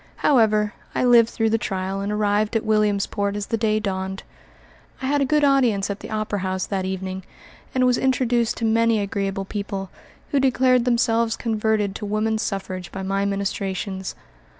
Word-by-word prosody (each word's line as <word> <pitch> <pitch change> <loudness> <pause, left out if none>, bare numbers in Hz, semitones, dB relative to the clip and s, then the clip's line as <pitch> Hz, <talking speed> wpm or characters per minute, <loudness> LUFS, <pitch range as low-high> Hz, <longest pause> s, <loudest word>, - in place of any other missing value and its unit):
However, 215 -6 +3 0.2
I - - +1
lived 235 -2 +6
through 225 -2 0
the 225 - +2
trial 195 -2 -3
and 200 +1 -2
arrived 210 +1 +1
at 225 - 0
Williamsport 205 -1 +1
as 205 -1 -3
the 230 - -1
day 215 -1 +1
dawned. 190 -2 -3 0.8
I - - -5
had 285 +2 +1
a - - +3
good 300 +2 +2
audience 245 -8 +3
at 200 - -5
the - - -9
opera 215 -1 -2
house 185 0 -2
that 190 -2 -2
evening, 190 0 -4 0.5
and 255 -1 +3
was 250 -1 +3
introduced 245 -3 +1
to 230 - -1
many 225 0 +3
agreeable 195 -1 -2
people, 195 -1 -5 0.4
who 280 - +3
declared 255 -2 +3
themselves 230 -2 +2
converted 220 -3 0
to 210 - -5
woman 215 +1 0
suffrage 190 -4 -4
by 195 - -5
my 195 +1 0
ministrations. 195 -1 -3
210 Hz, 175 wpm, -23 LUFS, 195-230 Hz, 0.8 s, lived